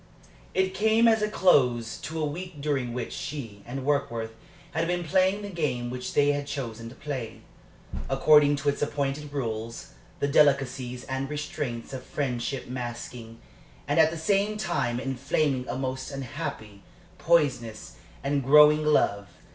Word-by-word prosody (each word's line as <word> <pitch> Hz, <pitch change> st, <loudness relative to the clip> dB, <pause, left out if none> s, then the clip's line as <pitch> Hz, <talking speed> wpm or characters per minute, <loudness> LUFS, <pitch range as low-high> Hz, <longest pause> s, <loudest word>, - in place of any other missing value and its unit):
It 190 Hz, 0 st, +2 dB
came 220 Hz, +3 st, +4 dB
as 220 Hz, -1 st, +4 dB
a 210 Hz, -, +1 dB
close 125 Hz, -, +3 dB
to 160 Hz, +1 st, -5 dB
a 155 Hz, -, +1 dB
week 170 Hz, +2 st, -6 dB
during 140 Hz, -4 st, -1 dB
which 120 Hz, 0 st, -4 dB
she 115 Hz, -9 st, -6 dB
and 130 Hz, +2 st, -5 dB
Warkworth 140 Hz, -6 st, 0 dB, 0.4 s
had 160 Hz, +2 st, 0 dB
been 175 Hz, 0 st, -1 dB
playing 190 Hz, +4 st, +2 dB
the 205 Hz, -, -5 dB
game 130 Hz, -9 st, -2 dB
which 125 Hz, 0 st, -5 dB
they 145 Hz, 0 st, +5 dB
had 145 Hz, 0 st, -3 dB
chosen 115 Hz, -5 st, -5 dB
to 125 Hz, -, -13 dB
play, 130 Hz, -7 st, -5 dB, 0.7 s
according 145 Hz, +1 st, +5 dB
to 145 Hz, 0 st, 0 dB
its 140 Hz, -, -2 dB
appointed 145 Hz, 0 st, -2 dB
rules 115 Hz, -4 st, -4 dB, 0.3 s
the 140 Hz, -, +1 dB
delicacies 135 Hz, -3 st, +2 dB
and 135 Hz, +1 st, -3 dB
restraints 145 Hz, -5 st, -4 dB
of 130 Hz, -, -5 dB
friendship 130 Hz, -1 st, -3 dB
masking, 120 Hz, -2 st, -6 dB, 0.5 s
and 145 Hz, +3 st, +2 dB
at 160 Hz, -1 st, +6 dB
the 165 Hz, -, -5 dB
same 200 Hz, +5 st, +1 dB
time 145 Hz, -, -1 dB
inflaming, 135 Hz, 0 st, -1 dB
a -, -, -2 dB
most 130 Hz, 0 st, -3 dB
unhappy, 130 Hz, -7 st, -6 dB, 0.4 s
poisonous, 130 Hz, -10 st, +1 dB, 0.3 s
and 140 Hz, 0 st, 0 dB
growing 150 Hz, +3 st, +7 dB
love. 100 Hz, -9 st, +2 dB
140 Hz, 150 wpm, -27 LUFS, 125-155 Hz, 0.7 s, growing